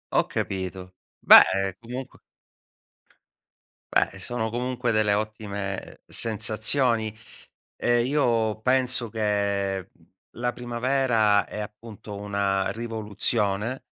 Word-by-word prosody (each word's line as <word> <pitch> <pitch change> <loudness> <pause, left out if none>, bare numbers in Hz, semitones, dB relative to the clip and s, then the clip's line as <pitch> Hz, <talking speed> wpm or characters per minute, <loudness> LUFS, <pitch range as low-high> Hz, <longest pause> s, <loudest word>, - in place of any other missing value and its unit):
Ho - - +4
capito. 95 -1 -4 0.3
Beh, 95 0 +7
comunque 125 +3 -8 1.8
Beh, - - +2
sono 110 +3 -1
comunque 125 +1 -2
delle 110 -2 +2
ottime 100 -2 -4
sensazioni 110 +1 +1 0.6
e 120 0 +2
io 115 -6 +1
penso 125 -1 +1
che 100 -3 -1 0.4
la 120 +1 -3
primavera 120 -4 +1
è, 105 - -8
appunto, 105 0 -9
una 100 -1 -1
rivoluzione, 110 0 -1
110 Hz, 85 wpm, -25 LUFS, 100-120 Hz, 1.8 s, Beh